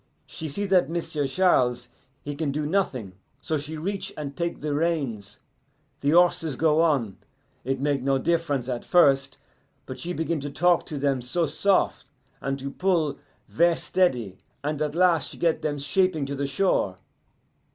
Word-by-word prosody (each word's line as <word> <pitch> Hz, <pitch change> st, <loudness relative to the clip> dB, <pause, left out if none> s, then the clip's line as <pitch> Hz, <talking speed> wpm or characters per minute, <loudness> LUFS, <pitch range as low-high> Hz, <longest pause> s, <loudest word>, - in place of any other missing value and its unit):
She 160 Hz, -, -6 dB
see 180 Hz, +8 st, -2 dB
that 185 Hz, -6 st, +3 dB
M'sieu' 160 Hz, -4 st, -2 dB
Charles, 125 Hz, -7 st, +2 dB, 0.3 s
he 145 Hz, -, -4 dB
can 145 Hz, 0 st, -2 dB
do 150 Hz, +1 st, -2 dB
nothing, 140 Hz, -, -1 dB, 0.3 s
so 155 Hz, +1 st, -2 dB
she 155 Hz, +2 st, -6 dB
reach 195 Hz, +5 st, -3 dB
and 140 Hz, -2 st, -5 dB
take 170 Hz, +3 st, -3 dB
the 150 Hz, 0 st, -2 dB
reins. 140 Hz, -, -2 dB, 0.6 s
The 140 Hz, -, 0 dB
horses 165 Hz, -3 st, +3 dB
go 155 Hz, +2 st, +3 dB
on; 135 Hz, -, +1 dB, 0.5 s
it 135 Hz, +1 st, -2 dB
make 140 Hz, -1 st, 0 dB
no 135 Hz, +1 st, +2 dB
diff'rence 150 Hz, -4 st, 0 dB
at 125 Hz, -2 st, -3 dB
first. 135 Hz, -6 st, +3 dB, 0.5 s
But 130 Hz, -, -8 dB
she 175 Hz, -, -4 dB
begin 165 Hz, -1 st, -1 dB
to 145 Hz, +1 st, -4 dB
talk 175 Hz, +4 st, +2 dB
to 150 Hz, -, -4 dB
them 135 Hz, -2 st, 0 dB
so 165 Hz, +8 st, 0 dB
sof', 185 Hz, +6 st, +1 dB, 0.4 s
and 135 Hz, 0 st, -2 dB
to 140 Hz, 0 st, -5 dB
pull 170 Hz, -6 st, 0 dB, 0.3 s
ver' 170 Hz, +1 st, +3 dB
steady, 125 Hz, -, 0 dB, 0.2 s
and 150 Hz, +1 st, -2 dB
at 150 Hz, 0 st, -1 dB
last 175 Hz, -4 st, +3 dB
she -, -, -9 dB
get 165 Hz, -2 st, +1 dB
them 145 Hz, -1 st, -2 dB
shaping 155 Hz, +2 st, +1 dB
to 140 Hz, -, -4 dB
the 140 Hz, 0 st, -2 dB
shore. 135 Hz, -, +1 dB
150 Hz, 170 wpm, -25 LUFS, 135-170 Hz, 0.6 s, that